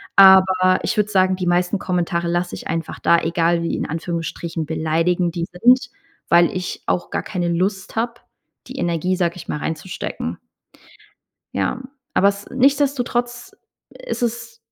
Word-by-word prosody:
Aber 190 Hz, -1 st, +6 dB
ich 230 Hz, -, -1 dB
würde 210 Hz, 0 st, +1 dB
sagen, 185 Hz, -1 st, +3 dB
die 185 Hz, -, -3 dB
meisten 180 Hz, +3 st, +1 dB
Kommentare 175 Hz, -1 st, -1 dB
lasse 175 Hz, +1 st, -1 dB
ich -, -, -8 dB
einfach 165 Hz, 0 st, -4 dB
da, 170 Hz, -, +4 dB
egal 170 Hz, +1 st, +1 dB
wie- 170 Hz, -, -1 dB
in -, -, -3 dB
Anführungsstrichen- 165 Hz, 0 st, -4 dB
beleidigend 165 Hz, +3 st, 0 dB
die 170 Hz, -, -1 dB
sind, 245 Hz, +7 st, +3 dB, 0.4 s
weil 170 Hz, 0 st, +6 dB
ich 180 Hz, -1 st, -5 dB
auch 175 Hz, -, -1 dB
gar -, -, -2 dB
keine 175 Hz, -4 st, -2 dB
Lust 190 Hz, +3 st, -1 dB
habe 235 Hz, +1 st, -1 dB, 0.5 s
die 265 Hz, -, -9 dB
Energie, 175 Hz, +2 st, 0 dB
sage 175 Hz, -2 st, 0 dB
ich 175 Hz, -, -10 dB
mal, -, -, -2 dB
reinzustecken. 160 Hz, +4 st, -4 dB, 1.2 s
Ja, 255 Hz, -, -1 dB, 0.3 s
aber 200 Hz, -, +5 dB
es 200 Hz, 0 st, -3 dB
nichtsdestotrotz 250 Hz, -3 st, 0 dB, 0.5 s
ist 360 Hz, -, -4 dB
es 230 Hz, -1 st, -3 dB
180 Hz, 150 wpm, -20 LUFS, 170-210 Hz, 1.2 s, Aber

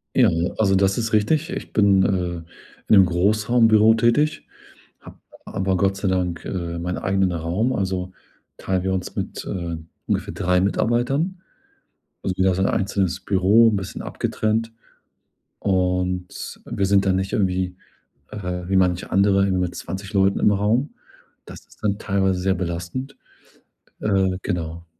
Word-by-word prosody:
Ja, 125 Hz, -5 st, +5 dB, 0.3 s
also, 100 Hz, -3 st, +3 dB
das 95 Hz, 0 st, +2 dB
ist 115 Hz, -2 st, -2 dB
richtig. 150 Hz, -, +2 dB
Ich 195 Hz, -, -6 dB
bin, 100 Hz, -2 st, +4 dB
äh, -, -, +2 dB, 0.3 s
in 80 Hz, -, -13 dB, 0.4 s
'nem 100 Hz, -3 st, +7 dB
Großraumbüro 110 Hz, +4 st, +4 dB
tätig, 120 Hz, +7 st, +1 dB, 0.5 s
habe -, -, -14 dB, 0.3 s
aber 95 Hz, -1 st, -1 dB
Gott 95 Hz, -1 st, +1 dB
sei 95 Hz, 0 st, -1 dB
Dank, 90 Hz, -3 st, -1 dB
äh, 85 Hz, -2 st, -4 dB
meinen 90 Hz, +1 st, -3 dB
eigenen 95 Hz, -1 st, +1 dB
Raum, 85 Hz, +9 st, -1 dB
also, 95 Hz, -4 st, -2 dB, 0.5 s
teilen 95 Hz, -1 st, -1 dB
wir 95 Hz, 0 st, -1 dB
uns 95 Hz, -1 st, -4 dB
mit, -, -, -4 dB
äh, 85 Hz, -3 st, -4 dB, 0.3 s
ungefähr -, -, -2 dB
drei 90 Hz, -1 st, +1 dB
Mitarbeitern. 125 Hz, -, 0 dB, 0.8 s
Also, 95 Hz, -, -2 dB
jeder 95 Hz, -1 st, +2 dB
so 95 Hz, -, -1 dB
'n 95 Hz, -, +2 dB
einzelnes 95 Hz, -2 st, 0 dB
Büro 100 Hz, +4 st, +4 dB
'n -, -, 0 dB
bisschen 95 Hz, -2 st, -5 dB
abgetrennt. 110 Hz, +1 st, -2 dB, 0.9 s
Und 90 Hz, -1 st, -2 dB
wir 100 Hz, -, -1 dB
sind 100 Hz, 0 st, +3 dB
dann 95 Hz, -, +3 dB
nicht 95 Hz, +1 st, -2 dB
irgendwie, 90 Hz, -2 st, 0 dB, 0.5 s
äh, 90 Hz, -4 st, -5 dB
wie 95 Hz, -, +1 dB
manche 90 Hz, -1 st, +1 dB
andere 100 Hz, 0 st, +3 dB
mit 90 Hz, -1 st, -1 dB
20 95 Hz, +4 st, -7 dB
Leuten 95 Hz, 0 st, +2 dB
im -, -, +4 dB
Raum. 105 Hz, +8 st, 0 dB, 0.5 s
Das -, -, -12 dB
ist -, -, -23 dB
dann 100 Hz, -1 st, +1 dB
teilweise 95 Hz, -3 st, 0 dB
sehr 95 Hz, +1 st, +1 dB
belastend. 90 Hz, +10 st, -5 dB, 0.8 s
Äh, 95 Hz, -3 st, +1 dB
genau. 85 Hz, -1 st, -4 dB
95 Hz, 150 wpm, -22 LUFS, 90-105 Hz, 0.9 s, nem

